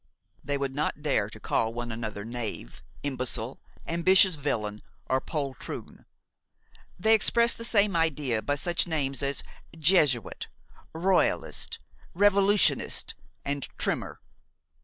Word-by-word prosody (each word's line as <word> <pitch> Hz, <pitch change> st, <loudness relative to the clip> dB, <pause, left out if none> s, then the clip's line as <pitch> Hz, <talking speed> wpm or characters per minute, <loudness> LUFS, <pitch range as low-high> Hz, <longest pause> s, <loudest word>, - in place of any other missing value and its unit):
They 145 Hz, 0 st, -1 dB
would 140 Hz, -1 st, -2 dB
not 150 Hz, +1 st, -2 dB
dare 110 Hz, -9 st, +1 dB
to 110 Hz, -, -11 dB
call 115 Hz, +1 st, 0 dB
one 120 Hz, 0 st, -4 dB
another 110 Hz, -2 st, -5 dB
knave, 115 Hz, -, -5 dB, 0.2 s
imbecile, 130 Hz, -3 st, -2 dB, 0.3 s
ambitious 185 Hz, +3 st, +5 dB
villain 110 Hz, -8 st, -2 dB, 0.3 s
or 130 Hz, 0 st, +1 dB
poltroon. 140 Hz, -5 st, -6 dB, 0.9 s
They 220 Hz, +5 st, +4 dB
express 235 Hz, +2 st, +4 dB
the 230 Hz, -, -8 dB
same 205 Hz, -4 st, +2 dB
idea 150 Hz, -8 st, +1 dB
by 145 Hz, +7 st, 0 dB
such 175 Hz, +5 st, 0 dB
names 140 Hz, -5 st, -1 dB
as 140 Hz, -1 st, -1 dB, 0.3 s
jesuit, 150 Hz, -, +2 dB, 0.4 s
royalist, 180 Hz, +3 st, 0 dB, 0.4 s
revolutionist 200 Hz, +1 st, +3 dB, 0.3 s
and 140 Hz, -1 st, -2 dB
trimmer. -, -, -2 dB
145 Hz, 115 wpm, -28 LUFS, 120-180 Hz, 0.9 s, ambitious